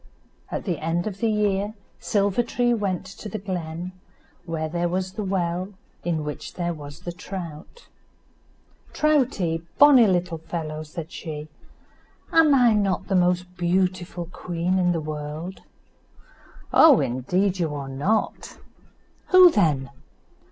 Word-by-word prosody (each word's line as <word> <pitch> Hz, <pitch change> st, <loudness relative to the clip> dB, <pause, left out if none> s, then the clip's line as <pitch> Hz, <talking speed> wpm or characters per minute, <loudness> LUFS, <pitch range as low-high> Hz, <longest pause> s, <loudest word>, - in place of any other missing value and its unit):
At -, -, -4 dB
the 175 Hz, -5 st, -2 dB
end 165 Hz, +2 st, 0 dB
of 205 Hz, -3 st, -5 dB
the 230 Hz, -, +1 dB
year, 210 Hz, 0 st, 0 dB, 0.2 s
Silver 200 Hz, +1 st, +1 dB
tree 240 Hz, 0 st, +1 dB
went 195 Hz, -5 st, -1 dB
to 195 Hz, +3 st, -9 dB
the 215 Hz, -, -4 dB
glen, 180 Hz, -3 st, -5 dB, 0.5 s
where 160 Hz, -2 st, -3 dB
there 175 Hz, +2 st, -1 dB
was 185 Hz, +1 st, -2 dB
the 215 Hz, -, -4 dB
well, 185 Hz, 0 st, -2 dB, 0.3 s
in 165 Hz, -3 st, -1 dB
which 150 Hz, 0 st, -6 dB
there 175 Hz, -1 st, -2 dB
was 145 Hz, +1 st, -10 dB
the 175 Hz, -, -5 dB
trout. 175 Hz, -, -8 dB, 1.1 s
"Troutie, 255 Hz, -, +1 dB, 0.2 s
bonny 275 Hz, -6 st, +8 dB
little 175 Hz, -3 st, 0 dB
fellow," 155 Hz, -1 st, -5 dB
said 155 Hz, +1 st, -8 dB
she, 155 Hz, -2 st, -7 dB, 0.8 s
"am 325 Hz, -2 st, +5 dB, 0.3 s
not 195 Hz, -1 st, 0 dB
I -, -, -20 dB
the 195 Hz, -, +2 dB
most 180 Hz, 0 st, +1 dB
beautiful 180 Hz, 0 st, 0 dB
queen 180 Hz, +1 st, -2 dB
in 180 Hz, -1 st, +3 dB
the 170 Hz, -, 0 dB
world?" 155 Hz, +4 st, -6 dB, 1.1 s
"Oh! 305 Hz, -6 st, +8 dB
indeed 180 Hz, +10 st, 0 dB
you 160 Hz, -4 st, -1 dB
are 140 Hz, -1 st, -5 dB
not." 145 Hz, +12 st, -1 dB, 0.7 s
"Who 365 Hz, -1 st, +8 dB
then?" 150 Hz, -, +1 dB
180 Hz, 135 wpm, -24 LUFS, 165-200 Hz, 1.1 s, bonny